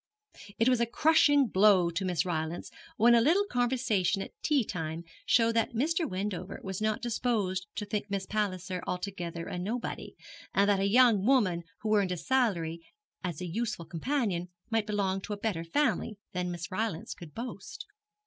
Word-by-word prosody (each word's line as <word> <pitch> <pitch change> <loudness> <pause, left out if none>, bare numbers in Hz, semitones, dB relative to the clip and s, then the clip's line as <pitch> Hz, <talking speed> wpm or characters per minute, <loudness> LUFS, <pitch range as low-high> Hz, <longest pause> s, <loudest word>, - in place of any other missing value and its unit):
It 230 - +3
was 250 -2 +4
a 235 - +2
crushing 290 +1 +4
blow 190 -5 +4
to 175 +4 -2
Miss 175 -4 0
Rylance 160 -1 -3 0.3
when 235 +2 +6
a 235 - +6
little 345 - +4
conversation 240 - +1
at - - -10
tea 290 -5 +2
time 165 -3 -4 0.2
showed 230 -1 +4
that 230 +1 +1
Mr. 320 +5 +1
Wendover 190 0 -4
was 190 +1 -4
not 215 0 0
disposed 210 -6 -1
to 210 - -3
think 205 0 -3
Miss 195 -1 -2
Palliser 185 -3 -2
altogether 180 -2 -4
a 180 - -4
nobody, 225 +7 -4 0.4
and 200 +1 +4
that 200 -1 +3
a 195 +1 +2
young 230 -3 +5
woman 205 -9 +3 0.2
who 215 -1 +2
earned 195 -3 +2
a 180 - -1
salary 170 -9 0 0.4
as 175 -4 -4
a - - -3
useful 210 0 -3
companion 180 - -1 0.2
might 225 -1 +1
belong 195 -2 0
to 210 - -5
a - - -4
better 200 -6 -2
family 215 - 0
than 180 -1 -2
Miss 175 -1 -5
Rylance 185 -3 -2
could 165 -4 -12
boast. 230 -4 -7
200 Hz, 175 wpm, -30 LUFS, 180-235 Hz, 0.4 s, when